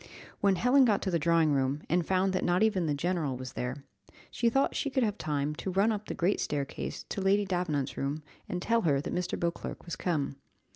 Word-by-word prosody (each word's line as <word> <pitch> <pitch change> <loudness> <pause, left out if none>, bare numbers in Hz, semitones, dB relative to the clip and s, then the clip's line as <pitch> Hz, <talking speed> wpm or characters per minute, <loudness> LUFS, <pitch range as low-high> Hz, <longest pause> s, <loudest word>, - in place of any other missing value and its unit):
When 200 -1 +3
Helen 250 +7 +5
got 215 -5 +2
to 190 - -1
the 170 - +2
drawing 165 -1 +3
room, 135 +1 0
and 175 +1 +2
found 190 +2 +1
that 185 - 0
not 180 +4 +3
even 195 -6 +2
the 145 - +1
general 155 -4 -1
was 130 0 -7
there, 125 +3 -4 0.5
she 235 - +2
thought 270 +4 +1
she 285 - 0
could 260 -2 +1
have 210 -3 0
time 150 -1 -1
to 190 - -4
run 195 +4 +3
up 210 -1 -4
the - - -4
great 180 +4 +1
staircase 140 -2 -3
to 195 - -3
Lady 200 +2 +3
Davenant's 175 -7 -1
room, 145 +3 -2 0.3
and 180 0 -3
tell 230 0 +2
her 145 -8 +2
that 145 - -4
Mr. 180 0 -2
Beauclerc 170 0 -3
was 170 - -4
come. 145 -6 -1
175 Hz, 225 wpm, -30 LUFS, 145-200 Hz, 0.5 s, Helen